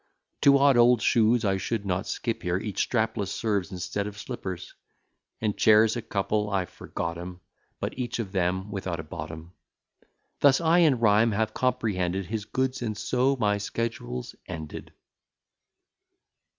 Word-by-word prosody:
Two 140 0 +7
odd 140 -2 +5
old 120 0 +6
shoes 115 0 +3
I 95 -1 +2
should 100 +2 -3
not 95 +1 -1
skip 115 -2 -3
here, 90 0 0
Each 100 0 -2
strapless 110 -4 0
serves 100 -6 -1
instead 95 +3 -3
of 100 -1 -8
slippers, 95 -6 -6 0.7
And 105 -2 -1
chairs 110 0 +5
a 120 - -2
couple, 105 +1 -1
I 95 -2 0
forgot 85 0 -5
'em, 90 0 -8 0.4
But - - -4
each 125 0 -2
of 110 -5 -4
them 95 +1 -1
without 95 -4 -3
a - - -4
bottom. 80 +2 -8 0.9
Thus 140 -2 +5
I 170 +1 +4
in 150 -8 +4
rhyme 110 0 +4
have 110 +1 0
comprehended 100 -7 0
His 105 +2 -4
goods, 130 +2 -1
and 110 -3 -3
so 130 +5 +1
my 105 -5 +1
schedule's 100 - -4
ended. 80 -2 -7
105 Hz, 150 wpm, -27 LUFS, 95-120 Hz, 0.9 s, Two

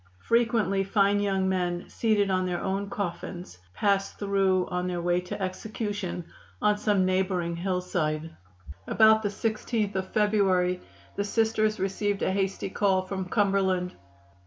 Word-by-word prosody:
Frequently 230 -4 +2
fine 200 +1 +2
young 195 -2 +1
men, 180 -2 -1
seated 210 -3 +1
on 185 0 +1
their 175 -1 -2
own 195 +1 -2
coffins, 180 - -5 0.2
passed 200 -1 +1
through 195 -2 +2
on 180 0 -2
their 180 -1 -2
way 175 +1 +1
to 180 - -6
execution 195 -2 -4 0.3
on 210 0 +2
some 205 -3 +2
neighboring 185 -2 0
hillside." 170 -4 -2 0.5
About 220 0 +5
the 205 - -1
16th 215 0 -1
of 190 0 -3
February 190 -4 +2 0.4
the 200 - +1
Sisters 215 0 +1
received 195 +1 -1
a - - +1
hasty 195 0 -1
call 190 -2 +2
from 190 0 -4
Cumberland. 190 -3 +1
195 Hz, 135 wpm, -27 LUFS, 180-205 Hz, 0.5 s, About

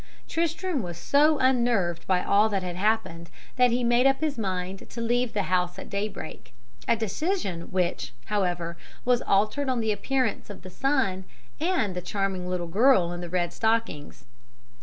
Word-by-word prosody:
"Tristram 330 -1 -1
was 175 -3 -6
so 295 - +3
unnerved 235 -10 +1
by 185 -1 +2
all 210 +2 +4
that 195 -3 -1
had 180 -1 -4
happened 190 -4 -1 0.3
that 250 0 +5
he 245 +1 0
made 240 +2 +4
up 270 0 +2
his 310 -2 -1
mind 190 -3 -4
to - - -8
leave 240 +1 0
the 205 - 0
house 180 -1 0
at - - -9
daybreak, 200 - -5 0.3
a - - +4
decision 220 - -2
which, 175 -7 -1
however, 175 -4 -1 0.3
was 245 -1 +3
altered 215 +8 +1
on 255 -2 +1
the 220 -1 +1
appearance 255 0 -1
of 205 - -9
the 185 - -9
sun 260 -8 0 0.4
and 320 - 0
the 180 - -3
charming 190 -1 -2
little 180 -1 -2
girl 190 0 +4
in 175 0 -5
the 175 - -6
red 175 -1 -1
stockings. 220 - -1
205 Hz, 170 wpm, -26 LUFS, 180-250 Hz, 0.4 s, that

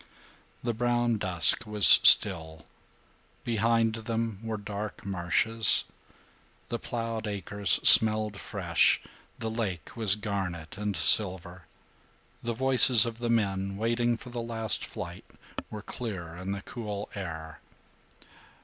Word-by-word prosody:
The 120 - -2
brown 120 -1 -1
dusk 95 +5 -1
was 105 -3 +2
still. 80 -6 +6 0.8
Behind 115 0 0
them 115 -2 -4
were 115 -1 -5
dark 105 0 -8
marshes. 100 +4 +1 0.8
The 120 - -4
plowed 115 -2 -5
acres 100 0 -3
smelled 110 -2 +7
fresh. - - 0 0.4
The 110 - -5
lake 100 -8 -5
was 110 -4 +3
garnet 95 -7 -6
and 105 -2 -4
silver. 90 -1 0 0.7
The 120 0 -4
voices 130 -2 +6
of 115 0 -7
the 120 -1 -4
men, 100 -4 -2
waiting 120 +2 -1
for 125 - -13
the 120 -1 -5
last 115 -2 -4
flight, - - -9 0.4
were 105 -1 -9
clear 95 -11 -7
in 90 +2 -7
the 100 0 -6
cool 105 -4 -7
air. 80 -5 -8
105 Hz, 120 wpm, -27 LUFS, 95-115 Hz, 0.8 s, smelled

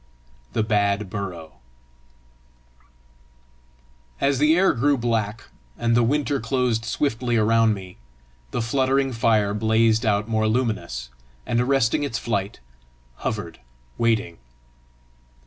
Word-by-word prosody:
THE - - +1
BAD 100 -2 0
BURROW 85 -9 -6 2.6
As 140 -1 +1
the 150 +2 +4
air 190 +2 +4
grew 140 +3 +2
black 115 -2 -1 0.3
and 115 0 +1
the 120 - +4
winter 140 +3 +1
closed 115 -1 0
swiftly 120 -1 -1
around 115 0 +3
me, 95 -2 -11 0.5
the 120 - -2
fluttering 135 +2 +1
fire 110 -3 +2
blazed 110 +1 +2
out 105 -1 +1
more 110 -1 +1
luminous, 110 - -2 0.3
and 120 0 +1
arresting 130 -2 +2
its 140 -6 -2
flight, 100 -3 -3 0.6
hovered 95 -7 -4 0.4
waiting. 110 - 0
115 Hz, 110 wpm, -23 LUFS, 105-125 Hz, 2.6 s, the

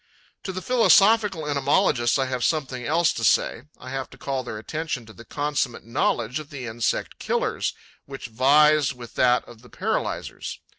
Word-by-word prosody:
To 190 - -2
the 185 0 -6
philosophical 215 -7 +4
entomologists 140 -4 +2
I 135 - +1
have 130 -2 -3
something 135 -5 -1
else 165 +2 +2
to - - -5
say: 120 - +2
I 130 - -10
have 135 -1 -4
to - - -15
call 135 -1 -3
their 120 -3 -6
attention 140 +2 -4
to 110 - -13
the 115 - -13
consummate 145 -6 -2
knowledge 115 +2 -1
of 150 -1 -10
the 135 -3 -7
insect 115 0 -2
killers, - - -1 0.3
which 135 -2 -8
vies 140 +4 +4
with 120 -2 -11
that 125 -1 +3
of 115 -2 -14
the 125 - -17
paralyzers. - - -3
135 Hz, 170 wpm, -24 LUFS, 120-155 Hz, 0.3 s, philosophical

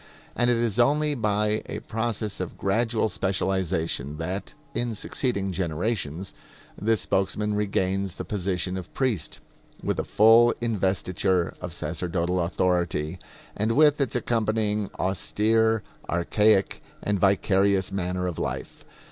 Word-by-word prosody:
And 120 0 +2
it 120 - +3
is 115 -1 0
only 150 +4 +3
by 105 -3 +1
a - - -4
process 110 -2 -3
of - - -5
gradual 110 +3 +1
specialization 95 -6 -1
that, 90 0 -4 0.2
in 120 -2 -2
succeeding 100 -3 -1
generations, 90 0 -2 0.4
this 110 +1 +1
spokesman 105 +2 0
regains 100 -2 0
the - - -6
position 95 -2 -2
of 90 - -7
priest, 120 - -1 0.4
with - - -1
a - - 0
full 115 +2 +6
investiture 95 -5 0
of - - -5
sacerdotal 90 0 -2
authority, 85 -2 0 0.4
and 110 +2 0
with 150 +2 +5
its 135 - 0
accompanying 110 -3 0
austere, 110 +4 +1 0.3
archaic 100 +4 +2 0.2
and 100 -1 0
vicarious 95 0 +3
manner 90 -1 -2
of 90 -3 -3
life. - - -4
100 Hz, 120 wpm, -26 LUFS, 90-110 Hz, 0.4 s, full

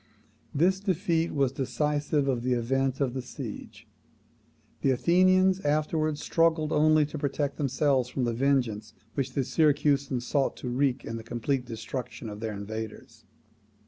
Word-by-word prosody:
This 185 +6 +2
defeat 175 -4 0
was 140 -3 +1
decisive 145 +2 0
of 125 -3 0
the 125 +1 +1
event 135 +2 0
of 135 -4 0
the 130 - -3
siege. 125 - -8 0.9
The 135 - +2
Athenians 185 +7 +4
afterwards 155 -1 0
struggled 165 -2 +2
only 155 0 +4
to 150 +1 -6
protect 145 0 -2
themselves 135 -2 +1
from 130 - -2
the 120 -1 0
vengeance 115 -5 0 0.2
which 135 - -2
the 135 - +1
Syracusans 145 -3 +1
sought 140 +1 0
to 125 - -5
wreak 130 +1 0
in 115 - -4
the 115 - -8
complete 125 +3 -2
destruction 120 +1 -6
of 105 0 -8
their 110 -1 -3
invaders. 110 +2 -7
135 Hz, 145 wpm, -28 LUFS, 125-150 Hz, 0.9 s, Athenians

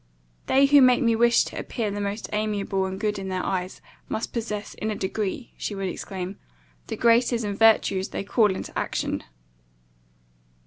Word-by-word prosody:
"They 270 +1 +5
who 285 0 +6
make 255 -1 +5
me 230 -1 +3
wish 235 +1 +4
to - - -6
appear 220 -4 -3
the 205 +1 -3
most 200 +2 -3
amiable 205 -2 -1
and 190 0 -5
good 210 -2 -1
in 190 - -5
their 185 -1 -2
eyes, 185 -1 -3 0.3
must 220 - -3
possess 210 -3 -4
in 220 - -4
a 215 - -2
degree," 205 +5 -3
she 205 - -4
would 195 -1 -2
exclaim, 190 +1 -6 0.5
"the - - -4
graces 235 0 +3
and 205 -1 -2
virtues 205 -3 +3
they - - -4
call 210 +1 +3
into - - -7
action." - - -2
210 Hz, 175 wpm, -25 LUFS, 195-230 Hz, 0.5 s, who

